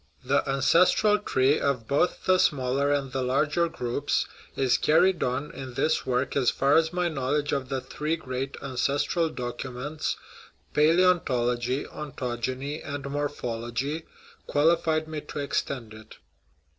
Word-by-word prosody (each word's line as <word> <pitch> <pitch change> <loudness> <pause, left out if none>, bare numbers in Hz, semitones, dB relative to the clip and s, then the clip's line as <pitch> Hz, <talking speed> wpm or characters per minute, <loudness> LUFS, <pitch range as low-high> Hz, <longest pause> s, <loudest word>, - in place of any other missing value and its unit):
The 135 +2 +3
ancestral 180 +9 +4
tree 135 -7 +2
of 125 -5 -1
both 145 +6 +1
the 185 0 +4
smaller 140 -1 +2
and 140 -2 0
the 135 0 -2
larger 150 +6 +1
groups 140 -2 -1 0.3
is 130 -2 +2
carried 175 +4 +3
on 130 +4 -1
in 130 -2 -8
this 155 - +1
work 125 +1 0
as 130 -4 +3
far 140 +1 +2
as 160 0 +3
my 180 0 0
knowledge 145 -1 -1
of 135 -2 -2
the 135 -1 -2
three 150 +5 -2
great 135 -3 -5
" - - -11
ancestral 140 +5 0
documents 125 +4 -4 0.3
" - - -30
palaeontology, 140 -7 +2
ontogeny, 130 0 -4
and 140 -1 -5
morphology 140 +1 -3 0.4
qualified 155 +1 +2
me 155 -1 -5
to 150 - -9
extend 135 -5 -2
it. 110 0 -13
140 Hz, 140 wpm, -27 LUFS, 130-155 Hz, 0.4 s, ancestral